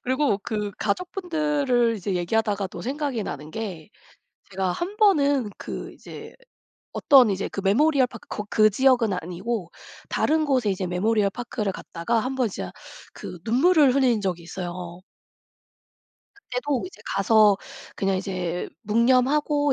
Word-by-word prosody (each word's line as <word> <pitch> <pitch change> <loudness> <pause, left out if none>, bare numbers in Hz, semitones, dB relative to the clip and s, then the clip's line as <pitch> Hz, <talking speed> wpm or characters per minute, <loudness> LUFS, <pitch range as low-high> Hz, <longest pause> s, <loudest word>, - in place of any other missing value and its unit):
그리고 260 -4 +1
그 210 -3 -3
가족분들을 295 - 0
이제 195 -2 -3
얘기하다가 205 +2 0
또 - - -9
생각이 270 -3 -2
나는 150 -3 -6
게 190 -8 -6 0.6
제가 190 -2 -1
1 375 - -4
번은 285 - +3
그 - - -6
이제 - - -11 0.6
어떤 260 -6 +5
이제 195 0 -2
그 195 - -5
메모리얼 270 +6 +4
파크 235 -2 -13
거 210 - -4
그 215 0 +5
지역은 245 -2 +3
아니고 180 +4 -4 0.4
다른 315 0 +1
곳에 255 -7 +1
이제 185 -1 -2
메모리얼 200 +3 +1
파크를 215 -4 -3
갔다가 220 +9 -2
1 255 +4 -3
번 250 -4 +1
진짜 95 - -6 0.4
그 180 - -8
눈물을 275 +3 +4
흘린 250 -6 +3
적이 180 -3 -2
있어요. 175 0 -7 1.4
그때도 275 -6 -3
이제 365 - -13
가서 210 0 +5 0.4
그냥 195 -1 0
이제 180 -2 -3
묵념하고 260 +6 +2
225 Hz, 285 characters per minute, -24 LUFS, 195-270 Hz, 1.4 s, 어떤